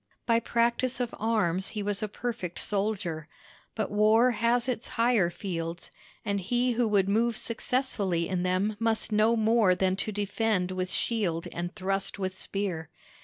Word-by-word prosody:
By 230 -1 +3
practice 235 +2 +1
of 245 -2 -2
arms 200 -5 +1
he 205 - -1
was 205 0 -2
a 215 - -1
perfect 205 -5 -4
soldier; 195 -7 -2 0.5
but 220 - -2
war 215 +4 +5
has 235 +1 +1
its 245 -2 -2
higher 230 -6 +3
fields, 170 -2 -5 0.3
and 200 -1 0
he 245 +6 +1
who 240 0 +1
would 200 -3 +3
move 225 +3 +2
successfully 225 -8 -1
in 185 -2 -1
them 185 +4 0
must 225 -1 0
know 215 +2 +4
more 220 -4 +4
than 185 0 +1
to 215 - -1
defend 205 -2 0
with 185 0 -2
shield 185 -7 -1
and 175 +2 -4
thrust 195 0 -1
with 190 -1 -3
spear. 185 -5 -3
210 Hz, 160 wpm, -28 LUFS, 185-230 Hz, 0.5 s, war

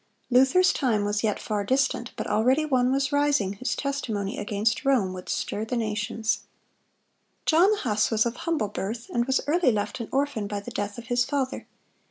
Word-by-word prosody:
(126) 245 - -2
Luther's 270 +9 +5
time 220 -7 +1
was 205 +1 -1
yet 210 -2 0
far 210 -2 -2
distant; 260 +1 0
but - - -4
already 255 +8 +2
one 255 -4 +2
was 275 +1 +1
rising, 285 -9 +2
whose 230 +7 -3
testimony 220 -8 -3
against 210 +2 0
Rome 240 -9 +2
would 180 0 -8
stir 210 - -2
the 230 +3 -2
nations. 220 0 -1 1.1
John 340 +5 +5
Huss 215 - 0
was 220 -1 +2
of 235 0 -2
humble 315 - -1
birth, 225 +5 -5
and 240 0 +1
was 265 +1 +1
early 310 -2 +3
left 215 +4 -2
an 230 - -5
orphan 270 -6 0
by 205 0 -3
the 200 - -9
death 205 +1 -3
of 235 - -8
his 245 +1 +2
father. 270 0 -2
235 Hz, 190 wpm, -26 LUFS, 210-270 Hz, 1.1 s, Luther's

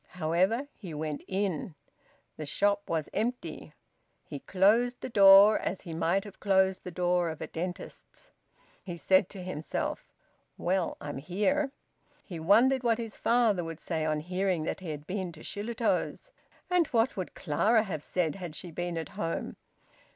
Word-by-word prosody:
However, 185 - +1
he 175 -7 -9
went 150 -1 -3
in. 190 -4 -2 0.6
The 155 - -6
shop 205 +5 +1
was 160 -2 -1
empty. 215 -9 -3 0.5
He 145 - -7
closed 225 - +2
the - - -5
door, 200 +1 +8
as 190 - -3
he 170 -4 -7
might 170 +4 +1
have 205 -2 -12
closed 190 -1 +2
the - - -6
door 180 0 +1
of 160 -1 -6
a - - -4
dentist's. 180 - -7 0.5
He 175 -3 -6
said 190 +2 +3
to 190 -3 -8
himself; 160 -5 -4 0.5
"Well, 180 0 0
I'm 145 -2 -5
here!" 210 - 0 0.5
He 175 -5 -7
wondered 235 +10 +4
what 235 -2 +2
his 225 -3 -6
father 230 -6 +2
would 165 -1 -6
say 160 -2 -2
on 155 -1 0
hearing 180 0 -1
that - - -3
he 185 -3 -7
had 150 -1 -6
been 185 -1 -3
to 155 - -13
Shillitoe's. 230 - -2 0.4
And 360 -3 +2
what 240 +2 +1
would 185 -2 -5
Clara 215 +8 +2
have 170 -8 -4
said, 165 -1 -1
had 175 -5 -7
she 175 +1 -7
been 175 +1 -3
at 165 - -4
home? 165 0 -4
185 Hz, 165 wpm, -29 LUFS, 165-210 Hz, 0.6 s, door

